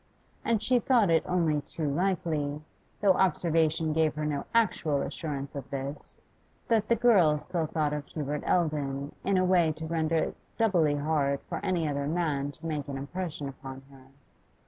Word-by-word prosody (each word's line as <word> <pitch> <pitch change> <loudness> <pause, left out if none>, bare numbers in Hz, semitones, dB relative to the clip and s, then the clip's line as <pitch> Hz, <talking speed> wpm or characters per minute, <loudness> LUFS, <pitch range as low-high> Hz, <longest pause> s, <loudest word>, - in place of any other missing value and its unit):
And 225 -3 +1
she 250 -1 +3
thought 230 -7 +3
it 160 -1 +4
only 165 -5 +1
too 155 +2 -4
likely, 155 -3 -1 0.4
though 200 -2 +5
observation 165 -4 +2
gave 160 -1 +2
her 150 0 -2
no 145 -2 -2
actual 165 -11 +2
assurance 140 -1 -5
of 140 -2 -7
this, 140 +1 -6 0.5
that 220 -2 +3
the 235 - +4
girl 200 -10 +5
still 165 +1 -2
thought 150 -1 0
of 150 -1 -4
Hubert 150 -1 -3
Eldon 145 -4 0
in 195 -1 +2
a 185 - +3
way 175 -3 +4
to 160 +1 -7
render 160 0 0
it 160 - 0 0.2
doubly 175 -10 +3
hard 145 -2 0
for - - -6
any 175 -4 0
other 140 -1 -1
man 150 -4 -1
to 165 +2 -11
make 150 -3 -3
an 140 -1 -4
impression 150 +1 -4
upon 135 -1 -9
her. 130 -1 -16
155 Hz, 170 wpm, -29 LUFS, 145-175 Hz, 0.5 s, though